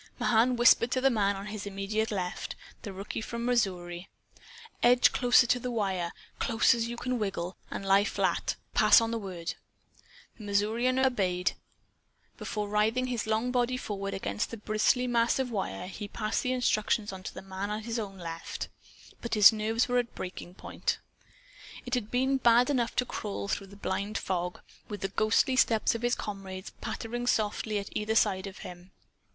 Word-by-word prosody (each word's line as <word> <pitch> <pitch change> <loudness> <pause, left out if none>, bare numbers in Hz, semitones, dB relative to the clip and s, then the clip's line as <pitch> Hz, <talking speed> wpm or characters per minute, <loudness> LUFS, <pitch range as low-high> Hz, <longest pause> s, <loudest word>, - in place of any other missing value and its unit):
Mahan 240 +2 +3
whispered 240 0 +5
to 255 - +2
the 270 +1 +4
man 200 -3 +2
on 195 +1 -6
his 210 -1 -6
immediate 200 +3 -2
left, 185 -4 -3 0.3
the 205 - -6
rookie 195 +3 -5
from 235 +1 -4
Missouri: 180 -7 -1 0.7
"Edge 245 +1 +6
closer 245 0 +5
to 245 +1 +2
the 250 - -4
wire 190 -7 -1 0.3
close 230 -1 +4
as 230 0 -1
you 235 0 -5
can 250 0 -2
wiggle, 190 -3 -3
and 195 - -5
lie 195 +1 +5
flat. - - 0 0.2
Pass 215 -1 +7
on 230 0 -1
the 230 - -1
word." 180 -5 -5 0.9
The - - -9
Missourian 220 +5 +1
obeyed. 195 -9 +1 0.9
Before 210 -1 -3
writhing 215 +5 +1
his 230 -2 -2
long 220 +3 0
body 250 0 +1
forward 200 -4 -4
against 100 - -2
the 230 - -6
bristly 215 +4 +2
mass 235 -1 +2
of 260 -2 -1
wire 190 - -3
he 200 +3 -6
passed 215 +1 -2
the 255 - -1
instructions 215 -4 +1
on 190 - -8
to - - -7
the - - -8
man 190 +1 -4
at 215 +1 -4
his 230 0 -2
own 195 -3 -5
left. 165 -2 -6 0.5
But 235 - -2
his 210 0 +9
nerves 220 +2 0
were 245 0 +2
at 240 -1 -4
breaking 180 -1 -7
point. - - -2 0.9
It 250 - -6
had 240 -4 0
been 265 +2 +2
bad 245 +1 +5
enough 240 -4 0
to 250 - +2
crawl 205 -4 -4
through 200 0 -2
the 200 - -14
blind 200 +2 -2
fog, 180 -1 -3 0.3
with 205 -3 -6
the 195 - -1
ghostly 215 +6 +2
steps 230 -3 +3
of 230 - -4
his 240 +1 +2
comrades 195 -2 -6
pattering 240 +2 -4
softly 215 -1 0
at 200 0 -6
either 215 +1 -1
side 190 -3 +2
of 195 - -10
him. 180 +1 -11
215 Hz, 180 wpm, -29 LUFS, 195-240 Hz, 0.9 s, his